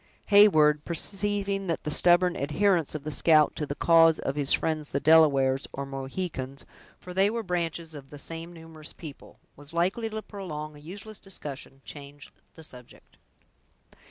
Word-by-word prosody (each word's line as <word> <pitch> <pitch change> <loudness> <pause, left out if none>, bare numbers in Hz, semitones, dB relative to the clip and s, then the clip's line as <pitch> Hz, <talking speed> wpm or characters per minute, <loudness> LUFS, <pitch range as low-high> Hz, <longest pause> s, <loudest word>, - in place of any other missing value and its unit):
Heyward, 155 -8 +6
perceiving 200 +2 -2
that 165 - -2
the 150 - -2
stubborn 175 +2 +4
adherence 165 +2 +1
of 150 - -5
the 155 - -5
scout 155 -1 +4
to 150 - -3
the 145 - -4
cause 165 0 +5
of 135 - -3
his 145 -2 +1
friends 155 -2 0
the 140 - -1
Delawares, 140 -4 +4
or 140 - -4
Mohicans, 135 0 -5 0.3
for 180 - -10
they 195 +2 +3
were 230 +1 -3
branches 170 -3 -3
of 140 -2 -11
the 145 - -10
same 165 +4 -7
numerous 160 -2 -11
people, 150 -4 -12 0.2
was 145 +2 -14
likely 190 +7 0
to 220 0 -6
prolong 155 -7 -7
a - - -13
useless 195 +7 -9
discussion, 140 -7 -9
changed 145 0 -11 0.2
the 160 - -12
subject. 125 -5 -12
160 Hz, 160 wpm, -27 LUFS, 145-180 Hz, 0.3 s, Heyward